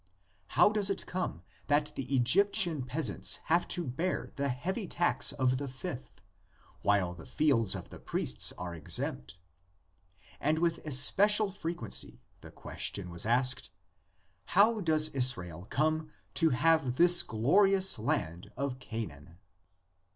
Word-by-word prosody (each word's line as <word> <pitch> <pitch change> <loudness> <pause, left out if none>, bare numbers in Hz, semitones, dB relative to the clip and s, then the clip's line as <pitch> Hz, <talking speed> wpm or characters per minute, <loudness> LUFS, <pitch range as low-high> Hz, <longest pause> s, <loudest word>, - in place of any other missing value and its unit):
How 175 +6 +6
does 210 -2 +1
it 195 - -3
come 180 - -5 0.2
that 145 0 +1
the 130 0 -7
Egyptian 170 - +2
peasants 130 +5 -1 0.2
have 175 - +2
to 175 -1 0
bear 165 +8 -3
the 140 0 -2
heavy 185 - -4
tax 175 +1 0
of 130 -2 0
the 140 - -5
fifth, 130 - -8 0.6
while 100 -4 +1
the 85 -3 -13
fields 125 -10 +1
of - - -8
the - - -12
priests 65 - -1
are 90 -1 -6
exempt? 80 -1 -5 1.0
And 150 +2 0
with 165 0 0
especial 200 +10 +4
frequency 165 - -6 0.2
the - - -13
question 90 -3 -5
was 85 +5 -3
asked, 125 +2 0 0.9
How 220 +2 +5
does 155 -3 +3
Israel 95 - -1
come 155 +2 -1 0.2
to 165 -2 +2
have 140 -1 +1
this 175 +3 +8
glorious 190 - +2
land 85 -6 -3
of 135 -1 -4
Canaan? 85 - -8
140 Hz, 130 wpm, -30 LUFS, 115-175 Hz, 1.0 s, this